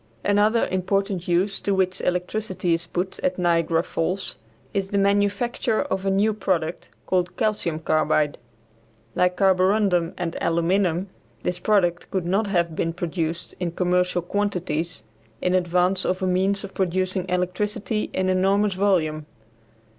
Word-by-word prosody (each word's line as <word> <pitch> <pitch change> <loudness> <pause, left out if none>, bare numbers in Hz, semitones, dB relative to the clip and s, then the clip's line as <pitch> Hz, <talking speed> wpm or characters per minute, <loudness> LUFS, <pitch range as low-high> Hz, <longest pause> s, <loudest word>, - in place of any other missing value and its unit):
Another 210 +3 +3
important 190 0 -1
use 185 +3 +1
to 200 - +1
which 185 -1 0
electricity 180 0 -1
is 165 0 -2
put 180 +2 -3
at 180 - -1
Niagara 165 -2 +2
Falls 180 +3 -2 0.4
is 195 -1 -1
the 200 - 0
manufacture 205 +4 +1
of 195 -9 -3
a - - +4
new 200 +3 +2
product, 180 -5 -2 0.2
called 180 -1 0
calcium 215 -8 0
carbide. 155 -2 +1 0.7
Like 180 0 +1
carborundum 190 -2 +3
and 170 -2 -3
aluminum, 175 +2 +1 0.3
this 180 0 -2
product 175 -5 +1
could 185 -3 -2
not 195 +5 +1
have 170 -4 0
been 165 +1 -1
produced 170 -1 -3
in 175 -2 -2
commercial 180 0 +1
quantities 175 - -2 0.4
in 180 - 0
advance 180 +1 +2
of 185 +1 -1
a - - +2
means 190 +2 +1
for 200 - -6
producing 185 0 -1
electricity 205 +4 -1
in 185 0 -1
enormous 195 +2 +2
volume. 165 -6 +1
185 Hz, 140 wpm, -24 LUFS, 175-195 Hz, 0.7 s, a